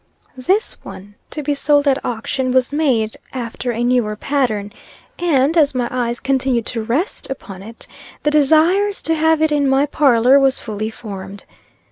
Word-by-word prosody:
This 410 +4 0
one, 205 +2 -11 0.2
to 300 - -6
be 290 +1 0
sold 290 0 +2
at 275 0 +1
auction, 250 +2 -2
was 260 +1 +1
made 250 -8 0 0.2
after 245 -1 -5
a 235 +1 -2
newer 240 -4 +1
pattern, 215 -5 -2 0.5
and, 310 -3 +2
as 295 -5 +3
my 245 -1 0
eyes 240 -1 -2
continued 260 -3 0
to 230 - -3
rest 260 - -2
upon 200 -8 -8
it, 225 +3 -12 0.4
the 300 - +2
desires 320 +8 +3
to 325 - +1
have 320 0 +2
it 315 - +2
in 285 -2 +2
my 270 +2 +3
parlor 270 -2 +4
was 270 -1 +2
fully 215 -1 -5
formed. 200 -3 -9
265 Hz, 165 wpm, -18 LUFS, 230-295 Hz, 0.5 s, parlor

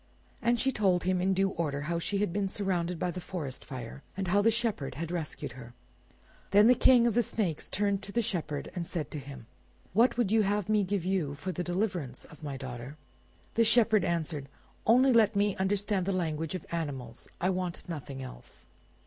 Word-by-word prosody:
And 235 0 +2
she 265 +3 +2
told 190 -7 +2
him 185 0 +1
in 190 +1 +2
due 195 +1 +3
order 145 -5 -2
how 170 +3 -1
she 200 +4 -1
had 195 -4 0
been 200 -1 0
surrounded 180 -4 -1
by 175 +2 -1
the 180 - -6
forest 155 -9 -5
fire, 130 0 -7 0.2
and 190 -2 -2
how 200 +3 +4
the 225 - +5
Shepherd 225 - -1
had 165 +3 -4
rescued 165 -4 -4
her. 120 0 -11 0.7
Then 205 +1 +6
the 245 - +8
King 245 -1 +6
of 235 - +3
the 240 - +4
snakes 195 -8 -1
turned 200 0 +1
to 200 - -7
the 235 +2 +1
Shepherd 165 -9 -3
and 170 -2 -4
said 155 -5 -4
to 150 - -4
him— 135 -3 -10 0.5
"What 235 +6 +4
would 235 -5 +1
you 220 0 +5
have 205 -1 0
me 210 -1 +4
give 190 -2 -1
you 180 -7 0
for 145 +6 -4
the 180 +1 -3
deliverance 175 - -2
of 150 - -15
my 145 -3 -4
daughter?" 130 +2 -7 0.6
The 230 - +4
Shepherd 220 -2 +4
answered, 155 -4 -2 0.4
"Only 255 +3 +6
let 225 -2 +5
me 205 -1 +2
understand 195 0 0
the 195 - +1
language 165 -2 -1
of 185 - -6
animals; 135 -8 -4
I 185 +2 +2
want 180 -2 -3
nothing 140 -5 -6
else." - - -11
180 Hz, 205 wpm, -30 LUFS, 150-205 Hz, 0.7 s, the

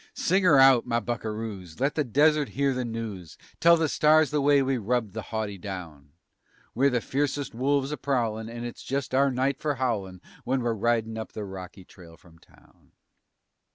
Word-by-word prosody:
Sing 190 +3 +1
'er 160 -6 +6
out, 135 -2 +6
my 115 -1 +1
buckeroos! 110 -6 -5
Let 140 +2 +1
the 150 - 0
desert 145 +2 +2
hear 140 -1 +2
the 125 0 -2
news. 110 -8 -6 0.2
Tell 170 0 +6
the 160 -1 +1
stars 155 0 +3
the 150 -1 +1
way 140 0 +4
we 130 -1 0
rubbed 115 -1 -1
the 110 - -4
haughty 105 -3 -4
down. 85 -7 -8 0.6
We're 135 +4 +3
the 125 -3 0
fiercest 140 0 -2
wolves 135 +3 0
a 150 - -3
prowlin' 115 -5 -2
and 120 +1 -6
it's 120 - -8
just 135 -1 -3
our 140 +1 +4
night 135 +1 -1
for 150 -2 -1
howlin' 100 -8 -3 0.2
When 130 +1 0
we're 120 -1 0
ridin' 115 0 -1
up 110 - -7
the 105 - -5
rocky 95 -1 -9
trail 85 -3 -15
from 80 -2 -21
town. - - -25
120 Hz, 190 wpm, -26 LUFS, 105-140 Hz, 0.6 s, er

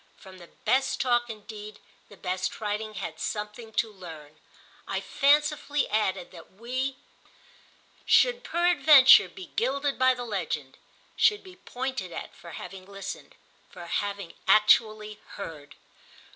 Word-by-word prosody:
From 190 -1 -14
the 175 - -13 0.2
best 265 0 +2
talk 240 -2 +1
indeed 210 -1 -9 0.3
the 205 - -15
best 185 0 -3
writing 215 0 -3
had 195 - -6
something 210 +2 -5
to 220 0 0
learn. 155 -5 -12 0.5
I - - -2
fancifully 295 0 +2
added 195 -4 -1
that 170 -1 -14
we 255 +6 -3
too - - -27 1.1
should - - +4
peradventure 300 - +6
be 185 0 -11
gilded 275 +3 0
by 260 0 +4
the 245 0 -6
legend, 165 - -4 0.4
should 420 -1 +3
be 370 -1 -13
pointed 260 - -5
at - - -7
for 170 - -12
having 185 +1 -9
listened, 200 -1 -8 0.3
for 175 - -10
having 200 0 -3
actually 215 0 +3 0.2
heard. 155 -7 -9
215 Hz, 130 wpm, -27 LUFS, 190-260 Hz, 1.1 s, peradventure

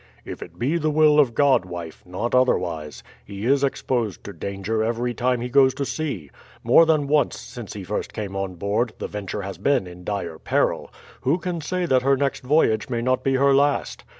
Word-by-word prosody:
"If - - -7
it 85 0 -10
be 145 - 0
the 155 -1 0
will 150 0 +5
of 125 -6 +3
God, 135 -6 +4
wife, 85 -2 -8
not 95 +7 -3
otherwise. 85 - 0 0.2
He 100 +1 -7
is 140 +2 +3
exposed 120 -7 -1
to 100 - -8
danger 100 +5 -3
every 120 +2 -1
time 125 +1 0
he 125 - -2
goes 130 0 +4
to 140 - -2
sea. 130 - -4 0.3
More 130 +8 +6
than 155 -3 +2
once 150 0 +1
since 120 -3 -9
he 100 - -7
first 105 +3 -3
came 100 -3 -5
on 95 -2 -3
board, 105 +6 -1
the - - -4
Venture 105 0 -5
has 95 0 -7
been 140 -9 +2
in 90 0 -11
dire 90 -5 -4
peril; - - 0 0.3
who 140 +6 +2
can 180 -2 -4
say 180 +4 -2
that 130 -5 +3
her 135 +1 +3
next 140 0 -1
voyage 130 -5 +2
may 120 -2 -2
not 130 +1 +1
be 135 0 +1
her 140 +1 +4
last. 140 +1 +1
120 Hz, 205 wpm, -23 LUFS, 100-140 Hz, 0.3 s, More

